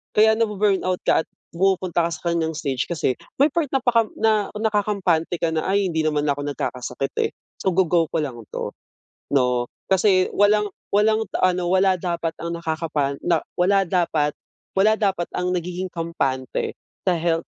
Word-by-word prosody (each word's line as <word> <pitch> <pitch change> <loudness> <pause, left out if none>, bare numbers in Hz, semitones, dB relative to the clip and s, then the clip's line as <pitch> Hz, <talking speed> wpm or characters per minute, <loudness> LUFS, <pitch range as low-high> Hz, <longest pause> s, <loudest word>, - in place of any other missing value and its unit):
Kaya 220 +1 +6
na 230 - +3
bu-burnout 195 -3 +1
ka 160 - +4
at - - -31 0.3
pumupunta 180 -1 +1
ka 170 - -2
sa 160 - -7
ganiyang 165 -1 0
stage, 140 -4 -2
kasi 155 -7 -1 0.2
may 290 - +6
part 330 +2 0
na 270 - +2
pakam 230 -3 +2
na 215 -2 +2
nakakampante 200 -6 0
ka 165 - +2
na, 160 -1 -1
"Ay 200 +1 +2
hindi 160 -2 0
naman 150 -1 +1
ako 145 0 -1
nagkakasakit 135 -1 -3
eh, - - -3 0.3
so 190 - 0
go 190 0 +3
go 170 -1 +3
ko 160 - 0
lang 130 -5 -4 0.2
'to," - - -3 0.6
'no. 125 -3 +1 0.2
Kasi 190 -1 +3
walang 210 +1 +3 0.2
walang 215 +2 +3 0.2
ano 180 -1 +2
wala 190 +1 +3
dapat 170 -2 -2
ang 170 0 -3
nakakapan 155 -4 -2
na 170 -2 +1
wala 195 +2 +3
dapat 165 -4 +1 0.4
wala 215 +3 +4
dapat 195 -5 0
ang 180 0 0
nagiging 180 +1 -3
kampante 140 -7 -2 0.3
sa 185 - +3
health, 165 0 0
175 Hz, 170 wpm, -23 LUFS, 160-195 Hz, 0.6 s, Kaya